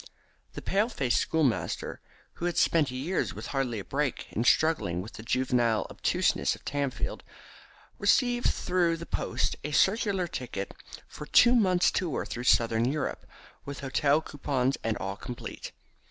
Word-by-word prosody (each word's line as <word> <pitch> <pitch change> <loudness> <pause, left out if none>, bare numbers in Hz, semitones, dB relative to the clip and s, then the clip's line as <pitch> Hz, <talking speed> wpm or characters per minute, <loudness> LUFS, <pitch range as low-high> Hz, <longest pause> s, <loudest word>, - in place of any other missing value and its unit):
The - - -7
pale 205 +4 +1
faced 135 - +1
schoolmaster, 155 -8 -1 0.4
who 170 - -3
had 175 -1 -1
spent 155 -4 +3
years 135 +9 -2
with - - -7
hardly 130 -4 -1
a 100 - -4
break 140 -2 -2
in 115 - -1
struggling 120 - +2
with 100 +5 -7
the - - -9
juvenile 120 -1 +1
obtuseness - - +1
of - - -19
Tamfield, 140 -2 -2 0.8
received 245 -1 +3
through 175 -2 +1
the 170 - -7
post - - -1
a 145 - -3
circular 195 +3 +2
ticket 120 -10 -5 0.3
for 150 - -9
a - - -21
two 240 +1 +6
months' 185 -6 +4
tour 170 -7 -1
through 120 +1 -5
Southern 115 -1 +3
Europe, 150 -1 -3 0.4
with 140 0 -7
hotel 140 +2 +2
coupons 135 -3 -1
and 115 -1 0
all 95 +1 -4
complete. 120 -1 -7
140 Hz, 155 wpm, -28 LUFS, 120-170 Hz, 0.8 s, two